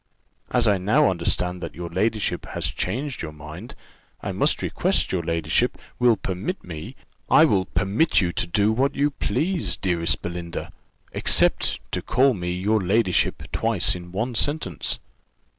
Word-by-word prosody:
As 120 -2 +3
I 100 -2 +3
now 105 +8 +3
understand 90 0 -1
that - - -6
your 85 0 -5
ladyship 105 -1 0
has - - -2
changed 130 +8 -2
your 80 - -5
mind, 75 +8 -10 0.5
I - - -2
must - - +1
request - - +1
your 95 - 0
ladyship 85 +8 0 0.2
will 120 -3 +4
permit 95 - -4
me 80 -3 -8 0.2
" - - -40
"I - - +7
will 95 -2 +2
permit 100 - +1
you 90 -3 +1
to 85 - -2
do 100 +5 +2
what 130 +5 +1
you 145 +1 +2
please, 155 - -1
dearest 85 -4 0
Belinda, 85 -1 -5 0.4
except - - +3
to - - -2
call 130 +1 +3
me 90 -4 -3
your 100 +4 +1
ladyship 95 -2 +1
twice 110 -5 +1
in 90 -1 -8
one 115 +7 -2
sentence. 115 - -1
95 Hz, 160 wpm, -24 LUFS, 85-115 Hz, 0.5 s, I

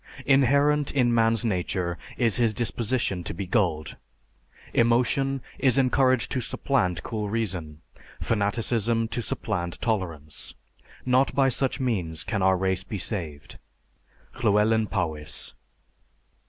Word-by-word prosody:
Inherent 140 +2 +3
in 125 -3 +2
man's 115 -1 +2
nature 90 -3 -1 0.2
is 115 -5 +1
his 115 -3 +2
disposition 115 -3 -1
to 85 - -4
be 100 +2 -4
gulled.... 85 - 0 0.8
Emotion 125 +3 +2 0.2
is 130 -2 +3
encouraged 130 -3 +3
to 130 - 0
supplant 90 - 0
cool 105 -2 -3
reason, 90 -9 -3 0.4
fanaticism 115 +1 +1
to 120 - -2
supplant 90 -6 -3
tolerance. 85 -10 -4 0.5
Not 130 +1 +2
by 135 -1 +4
such 130 +1 -1
means 90 - -1
can 105 - -2
our 95 0 +4
race 95 0 0
be 105 - -5
saved_. 85 - -4 0.8
LLEWELYN 110 0 +3
POWYS. 80 -7 -4
110 Hz, 115 wpm, -26 LUFS, 95-125 Hz, 0.8 s, by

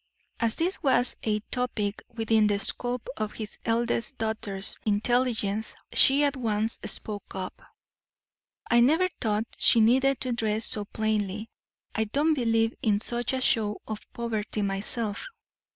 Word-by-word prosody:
As 230 -2 +2
this 355 +4 0
was 260 -4 +3
a 215 -1 0
topic 225 -5 -2
within 225 -2 +2
the 205 -1 +2
scope 245 +3 -2
of 215 -1 -3
his 215 -2 -7
eldest 235 +3 0
daughter's 220 -3 -2
intelligence 220 -1 +1 0.2
she 280 +2 +6
at 285 0 +1
once 225 -3 -1
spoke 205 -2 -5
up: 185 -1 -6 1.0
"I 235 - +4
never 320 +10 +4
thought 215 -1 0
she 230 - +5
needed 260 +4 +4
to 255 - -1
dress 220 -2 0
so 210 -1 -1
plainly. 215 0 -2 0.4
I 220 - 0
don't 290 +9 +2
believe 225 -4 +1
in 205 -2 +2
such 240 +2 -2
a 260 - -1
show 210 -4 +2
of 215 -1 -4
poverty 220 -2 -3
myself. 200 +2 -1
225 Hz, 140 wpm, -27 LUFS, 210-245 Hz, 1.0 s, she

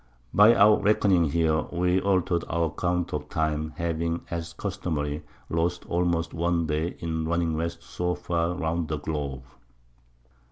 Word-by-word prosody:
By 105 +5 +7
our 105 +2 +6
Reckoning 100 -4 +3
here, 80 0 +2
we 90 +1 +1
alter'd 90 -3 +1
our 85 0 +1
Account 90 +2 -1
of - - -4
Time, 80 0 -1
having, 85 0 -2
as 85 -1 -4
customary, 75 -3 -3 0.3
lost 85 +1 -1
almost 85 -1 0
one 85 0 +1
Day 80 +2 -1
in 80 -1 -3
running 85 -1 0
West 85 +1 -3
so 90 0 -2
far 85 0 -1
round 85 -1 -1
the 75 -1 -2
Globe. 70 -3 -4
85 Hz, 145 wpm, -26 LUFS, 80-90 Hz, 0.3 s, By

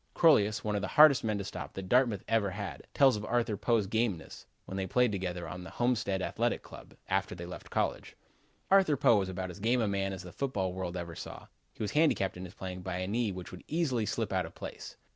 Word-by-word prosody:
'" - - -40
Crolius, 115 -7 +4
one 105 -2 -1
of 100 - 0
the 105 - -2
hardest 150 -3 +7
men 110 -2 0
to 100 - -3
stop 95 - -6
that 95 -1 -5
Dartmouth 120 -4 +3
ever 110 -3 +2
had, 100 +1 -6
tells 135 -3 +5
of 105 - -5
Arthur 115 0 0
Poe's 105 +1 +1
gameness, 105 -5 -2 0.2
when 95 - -7
they 95 -1 -2
played 125 +4 +3
together 90 -3 -3
on 90 +3 -7
the - - -8
Homestead 110 -6 0
Athletic - - -1
Club - - -12
team, - - -20
after 95 0 0
they 85 -1 -7
left 90 - -9
college. - - -2 0.6
"Arthur 190 -7 +5
Poe 115 - +5
was 95 -1 -2
about 95 0 -4
as 90 - -11
game 120 +5 +2
a 110 - +1
man 100 -1 0
as 95 -1 -6
the 90 - -9
football 100 -10 -1
world 90 -1 -4
ever 85 -1 -5
saw. - - -8 0.3
He - - -4
was 105 - -2
handicapped 150 -11 +2
in 90 +1 -7
his 90 +3 -11
playing 90 -1 -6
by 90 -1 -3
a 90 0 -2
knee 110 +1 0
which 90 -1 -7
would 90 - -10
easily 135 -9 0
slip - - -2
out - - 0
of - - -15
place. - - -8
100 Hz, 245 wpm, -31 LUFS, 95-120 Hz, 0.6 s, hardest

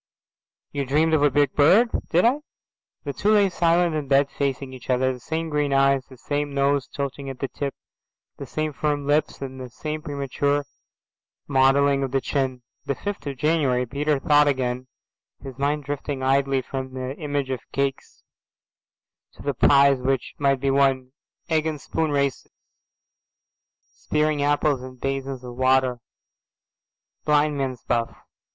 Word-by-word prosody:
"You 140 -1 -2
dreamed 155 +4 +2
of 155 - +4
a 145 - +5
big 140 0 +2
bird." 195 +11 +5 0.2
"Did 175 +5 +3
I?" 255 +5 +3 0.6
The 140 - -4
two 210 +7 +2
lay 200 -2 +4
silent 170 0 +2
in 150 -2 -2
bed 140 +1 +3
facing 135 -1 -2
each 130 -1 -12
other, 130 +1 +2
the 125 - -10
same 160 +5 -3
green 150 -2 0
eyes, 135 -1 +3
the 130 - -14
same 145 +2 -3
nose 140 -1 +1
tilting 140 0 -5
at 135 - -7
the 135 - -3
tip, 140 0 -4 0.6
the - - -7
same 155 -1 -2
firm 145 0 -1
lips, 145 0 0
and 130 -1 -7
the 125 - -7
same 155 +5 -5
premature 145 -1 -1 0.8
modelling 140 +1 +3
of 135 - -1
the 135 +1 +1
chin. 130 -2 -2 0.2
The 140 - -1
fifth 205 -3 -5
of 140 -2 -4
January, 140 -4 +1
Peter 145 +4 0
thought 145 +1 +4
again, 130 -2 -1 0.6
his 135 -1 -9
mind 145 +1 0
drifting 145 -1 -4
idly 135 0 +2
from 130 0 -6
the 130 +1 -4
image 145 -3 -2
of 130 - -2
cakes 140 -1 -3 1.1
to - - -13
the 140 - -1
prizes 140 0 +4
which 135 -1 -1
might 140 -2 +2
be 135 +1 +1
won. 135 -2 +2 0.4
Egg 160 -1 +1
and 155 -2 -3
spoon 160 +3 -2
races, 140 -2 -1 1.3
spearing 150 -1 -1
apples 145 -1 +1
in 130 0 -9
basins 135 0 -4
of 125 -1 -8
water, 130 -1 +2 1.2
blind 150 0 +2
man's 130 -3 -3
buff. 115 -1 -1
140 Hz, 160 wpm, -24 LUFS, 130-150 Hz, 1.3 s, a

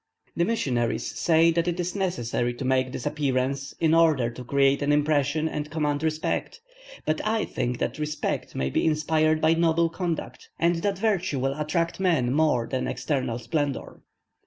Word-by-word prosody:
The 170 - +2
missionaries 125 - 0
say 165 0 +4
that 170 +1 0
it 175 0 -1
is 180 0 -2
necessary 120 - -1
to 130 - -5
make 130 0 +1
this 125 - -6
appearance, 135 -2 -1
in 160 -1 +3
order 155 -8 +4
to 125 +2 -9
create 140 +2 +2
an 145 +1 +1
impression 150 +1 +2
and 150 -1 -4
command 150 -2 -1
respect; 160 - -2 0.5
but 155 0 0
I 220 0 0
think 125 0 -2
that 125 - -3
respect 150 0 -3
may 65 0 -1
be - - +1
inspired 155 0 +2
by 160 +1 +4
noble 165 0 +2
conduct, 170 -1 -4
and 170 0 +2
that 195 +3 -1
virtue 195 -8 0
will 135 +1 0
attract 155 +4 -1
men 160 -10 +2
more 150 -6 +2
than 130 +1 -2
external 130 -3 -2
splendour. 145 +1 -3
150 Hz, 170 wpm, -26 LUFS, 135-165 Hz, 0.5 s, say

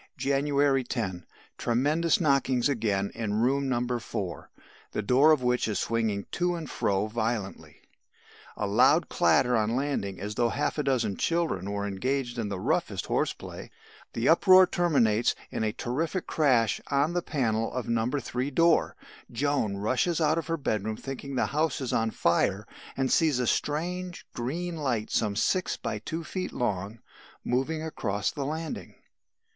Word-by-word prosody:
"January 140 -1 +2
10. 95 -8 -4 0.3
Tremendous 150 +8 +2
knockings 140 -5 +2
again 105 -7 0
in 110 -3 -2
room 135 +5 +1
No. 120 -1 0
4, 90 - -5 0.4
the 110 - -2
door 135 +8 +5
of 150 -5 +3
which 125 -1 +1
is 105 -3 -1
swinging 110 -2 -1
to 175 0 0
and 165 -3 -6
fro 100 0 0
violently. 110 -2 -4 0.8
A 105 - -1
loud 130 +11 +4
clatter 125 -1 +3
on 110 +1 +1
landing 130 -8 -2
as 105 +3 -4
though 120 +1 +1
half 145 +4 -1
a - - +1
dozen 120 -7 0
children 160 - 0
were 100 0 -2
engaged 120 +5 -2
in 110 -3 -2
the 100 -2 -4
roughest - - -1
horse - - 0
play. - - -9 0.4
The 115 +3 -1
uproar 185 +3 +7
terminates 120 -12 +2 0.2
in - - -2
a 110 - +1
terrific 155 - -2
crash 125 -8 +2
on 145 +4 +1
the 175 - 0
panel 115 -9 -1
of 125 -2 -4
No. 115 0 +1
3 130 -1 -2
door. 165 +3 +3 0.4
Joan 125 -5 0
rushes 130 - 0
out 155 0 +2
of 165 - -6
her 165 0 -1
bedroom 110 -6 -2
thinking 135 0 -6
the - - +2
house 155 0 0
is 130 -3 -3
on 115 0 +1
fire 95 +1 +1 0.3
and 135 -1 0
sees 155 -6 +3
a 125 - 0
strange, 175 +8 -2
green 165 +8 -3
light 125 -8 -2
some 105 -2 0
six 185 - 0
by - - -4
two 165 +1 -5
feet 185 +3 -4
long 105 -2 -2 0.4
moving 145 +6 -1
across 105 -10 -2
the 140 - -4
landing. 160 +1 -5
125 Hz, 160 wpm, -28 LUFS, 110-150 Hz, 0.8 s, uproar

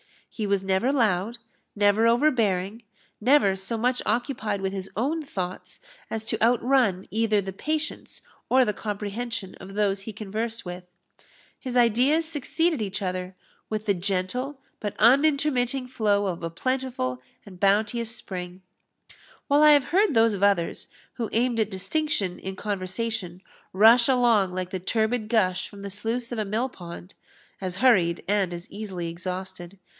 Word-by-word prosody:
He 215 -3 -3
was 200 -1 +1
never 190 +7 +1
loud, 225 -4 +1 0.4
never 205 +2 +4
overbearing, 230 -6 +2 0.4
never 235 -4 +4
so 195 +4 -2
much 250 +2 +1
occupied 220 -3 -1
with 190 0 -2
his 190 -1 -5
own 285 - 0
thoughts 185 -10 -5 0.3
as 220 0 -4
to - - -2
outrun 235 -4 +3
either 220 -1 +2
the 190 0 -6
patience 305 +8 -4 0.3
or 260 0 +5
the 210 - 0
comprehension 210 0 -4
of 195 +1 -11
those 200 -2 +1
he 215 +2 -7
conversed 220 +2 -4
with. 180 0 -7 0.7
His 250 -1 -3
ideas 250 +7 +3
succeeded 320 0 0
each 200 0 -3
other 185 0 -3 0.3
with 215 0 -3
the 205 - +3
gentle 195 +9 -2 0.2
but 205 -2 -4
unintermitting 270 0 +3
flow 210 -5 +1
of 175 -2 -3
a 165 - -3
plentiful 240 - -2 0.2
and 185 -3 -13
bounteous 220 +4 +2
spring; 180 -2 -7 0.8
while 285 +1 +4
I 305 0 +8
have 285 -2 +3
heard 395 +5 +3
those 225 -1 +5
of 200 - -4
others, 200 -4 +1 0.3
who 230 -3 -3
aimed 235 0 +1
at 215 -2 +1
distinction 200 - -1
in 190 0 -6
conversation, 190 -1 -4 0.3
rush 225 +5 +7
along 235 -8 +3
like 185 0 -4
the 185 - -3
turbid 220 +3 0
gush 185 -6 +1
from 200 -1 -12
the 200 - -5
sluice 230 +4 -3
of 240 - -3
a 215 - -1
mill 225 +6 -1
pond, 175 -3 -10 0.5
as 185 -2 -4
hurried, 185 -8 +3
and 200 -3 +1
as 175 0 -7
easily 195 -5 -5
exhausted. 185 +1 -6
210 Hz, 155 wpm, -25 LUFS, 190-245 Hz, 0.8 s, I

